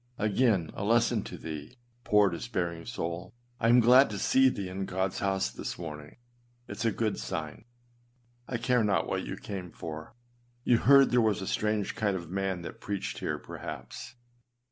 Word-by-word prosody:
Again, 105 Hz, -5 st, +2 dB
a -, -, -5 dB
lesson 115 Hz, +1 st, +3 dB
to -, -, -7 dB
thee, 80 Hz, -, -7 dB, 0.3 s
poor 105 Hz, -3 st, +4 dB
despairing 85 Hz, -3 st, -3 dB
souk 85 Hz, -5 st, -5 dB, 0.2 s
I 115 Hz, -, +2 dB
am 120 Hz, +1 st, +7 dB
glad 125 Hz, +4 st, +7 dB
to 105 Hz, -, -4 dB
see 130 Hz, +5 st, +4 dB
thee 100 Hz, -6 st, -4 dB
in 95 Hz, +1 st, -4 dB
Godâs 95 Hz, 0 st, -1 dB
house 95 Hz, -1 st, 0 dB
this -, -, -5 dB
morning; 75 Hz, -1 st, -8 dB, 0.5 s
it 105 Hz, -, -7 dB
is 115 Hz, -, -2 dB
a 115 Hz, -, +3 dB
good 110 Hz, -, -1 dB
sign. 75 Hz, -, -5 dB, 0.8 s
I 125 Hz, -, -2 dB
care 125 Hz, 0 st, +2 dB
not 100 Hz, -2 st, +2 dB
what -, -, -2 dB
you -, -, -4 dB
came 95 Hz, -3 st, -6 dB
for. 80 Hz, +3 st, -8 dB, 0.5 s
You 120 Hz, -2 st, +4 dB
heard 140 Hz, 0 st, +6 dB
there 125 Hz, -1 st, +4 dB
was 105 Hz, -3 st, +1 dB
a -, -, -4 dB
strange 105 Hz, -1 st, 0 dB
kind 100 Hz, -4 st, 0 dB
of 85 Hz, -2 st, -9 dB
man 95 Hz, -2 st, -2 dB
that -, -, -9 dB
preached 100 Hz, -1 st, -4 dB
here, -, -, -2 dB
perhaps. -, -, -8 dB
100 Hz, 180 wpm, -29 LUFS, 90-115 Hz, 0.8 s, am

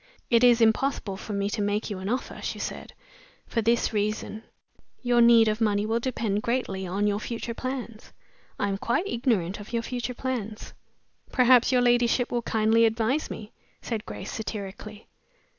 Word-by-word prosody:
"It 235 Hz, 0 st, +5 dB
is 240 Hz, -1 st, +6 dB
impossible 225 Hz, -2 st, +2 dB
for 210 Hz, +2 st, -7 dB
me 200 Hz, 0 st, 0 dB
to 210 Hz, -, -2 dB
make 205 Hz, +2 st, -1 dB
you 195 Hz, -, -4 dB
an 190 Hz, +2 st, -4 dB
offer," 250 Hz, +3 st, -3 dB
she -, -, -3 dB
said, -, -, -6 dB, 0.5 s
"for 230 Hz, -, -1 dB
this 230 Hz, +1 st, +1 dB
reason 215 Hz, +1 st, -2 dB, 0.6 s
your 245 Hz, -1 st, +3 dB
need 235 Hz, -1 st, +7 dB
of 215 Hz, +1 st, 0 dB
money 205 Hz, -1 st, +2 dB
will 225 Hz, +2 st, 0 dB
depend 225 Hz, -4 st, -1 dB
greatly 210 Hz, -6 st, -2 dB
on 195 Hz, +4 st, -1 dB
your 205 Hz, 0 st, +1 dB
future 230 Hz, +1 st, -4 dB
plans. 245 Hz, -3 st, -6 dB, 0.5 s
I 205 Hz, -, 0 dB
am 195 Hz, -1 st, -2 dB
quite 235 Hz, -, 0 dB
ignorant 220 Hz, -, 0 dB
of 205 Hz, +3 st, -11 dB
your 230 Hz, 0 st, 0 dB
future 250 Hz, 0 st, -4 dB
plans.'' 230 Hz, -5 st, -4 dB, 0.6 s
"Perhaps 250 Hz, -1 st, +5 dB
your 250 Hz, -1 st, +3 dB
ladyship 240 Hz, 0 st, +2 dB
will 240 Hz, -, 0 dB
kindly 225 Hz, 0 st, +3 dB
advise 225 Hz, +6 st, 0 dB
me?" 215 Hz, 0 st, -8 dB, 0.3 s
said 225 Hz, -2 st, -4 dB
Grace, -, -, -6 dB
satirically. 215 Hz, 0 st, -7 dB
225 Hz, 170 wpm, -26 LUFS, 210-240 Hz, 0.6 s, need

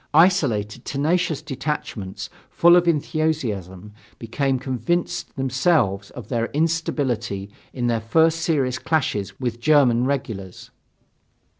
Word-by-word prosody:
Isolated 130 Hz, -, +3 dB
tenacious 155 Hz, +1 st, 0 dB
detachments 135 Hz, -9 st, -5 dB, 0.2 s
full 170 Hz, +1 st, +5 dB
of 175 Hz, -1 st, +3 dB
enthusiasm 120 Hz, -, -1 dB, 0.2 s
became 135 Hz, +4 st, -1 dB
convinced 130 Hz, +7 st, -2 dB
themselves 130 Hz, -, +1 dB
of 115 Hz, -5 st, -10 dB
their 115 Hz, -2 st, -1 dB
instability 140 Hz, -10 st, -1 dB, 0.2 s
in 125 Hz, -2 st, -3 dB
their 115 Hz, -2 st, +1 dB
first 160 Hz, +8 st, +3 dB
serious 135 Hz, -7 st, 0 dB
clashes 140 Hz, -11 st, -1 dB
with 120 Hz, -3 st, -3 dB
German 130 Hz, -5 st, +4 dB
regulars. 110 Hz, -9 st, -4 dB
130 Hz, 105 wpm, -22 LUFS, 115-155 Hz, 0.2 s, full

